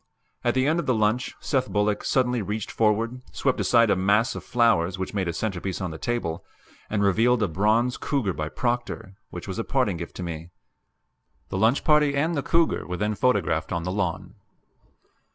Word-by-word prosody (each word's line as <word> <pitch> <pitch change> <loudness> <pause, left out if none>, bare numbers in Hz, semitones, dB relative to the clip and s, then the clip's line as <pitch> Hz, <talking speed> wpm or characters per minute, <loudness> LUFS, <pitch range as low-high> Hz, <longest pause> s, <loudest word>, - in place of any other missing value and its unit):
At - - +1
the 130 0 +2
end 160 +4 +2
of - - -3
the 130 - +3
lunch 110 +3 0
Seth 130 -3 -1
Bullock 105 0 0
suddenly 125 -2 +1
reached 105 +1 -4
forward, 115 +3 +1
swept 130 -2 0
aside 115 -3 +4
a - - +4
mass 100 +6 +2
of - - -7
flowers 105 -7 +2
which 95 +2 -4
made 95 -3 -1
a - - 0
centerpiece 95 0 -3
on 90 -3 -3
the 80 - -8
table, 90 -9 -2 0.5
and 105 -1 0
revealed 115 +4 +3
a - - +2
bronze 110 +8 +1
cougar 125 -10 -1
by 75 -1 -4
Proctor, 120 -3 -3 0.2
which 90 - -8
was 95 +3 -4
a - - 0
parting 125 -10 0
gift 85 0 -7
to 90 - -5
me. 85 -1 -6 1.0
The - - -3
lunch 115 +6 +3
party 150 -2 +4
and 160 +4 +1
the 145 - 0
cougar 165 +3 +1
were 90 0 -3
then 105 +2 0
photographed 105 -9 +1
on 85 -2 -1
the 90 - -2
lawn. 95 -4 -2
105 Hz, 195 wpm, -25 LUFS, 95-125 Hz, 1.0 s, aside